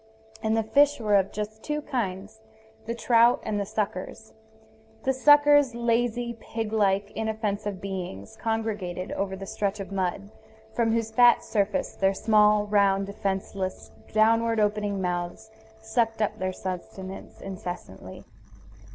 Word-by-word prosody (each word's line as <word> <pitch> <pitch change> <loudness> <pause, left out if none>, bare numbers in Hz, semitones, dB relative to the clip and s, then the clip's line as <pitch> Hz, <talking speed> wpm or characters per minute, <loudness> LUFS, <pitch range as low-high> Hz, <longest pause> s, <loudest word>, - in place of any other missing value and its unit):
And 220 0 +1
the 225 - +2
fish 285 +6 +3
were 210 -2 +2
of 195 -1 +2
just 215 +1 -5
two 300 +4 -2
kinds, 215 -3 -4 0.5
the 235 - -2
trout 235 0 +4
and 210 -1 -2
the 200 - -3
suckers. 215 +1 -4 0.7
The 265 - +2
suckers, 290 -1 +5
lazy, 235 0 0
pig 225 -1 -5
like, 200 -1 +2
inoffensive 210 -3 -3
beings, 180 - -6
congregated 210 -5 -3
over 195 -1 -2
the 195 +1 -7
stretch 200 +1 -2
of 195 0 -6
mud, 195 +1 -2 0.4
from 230 -1 +1
whose 225 -1 0
fat 240 +1 +5
surface 205 -2 -1
their 195 0 +1
small, 210 -1 +4
round, 200 -1 +3
defenseless, 195 -1 -4 0.2
downward 225 +1 +3
opening 205 -2 0
mouths 180 +5 -3 0.3
sucked 225 0 0
up 215 - -1
their 185 0 -1
sustenance 185 +1 -7
incessantly. 175 - -8
210 Hz, 135 wpm, -26 LUFS, 195-225 Hz, 0.7 s, suckers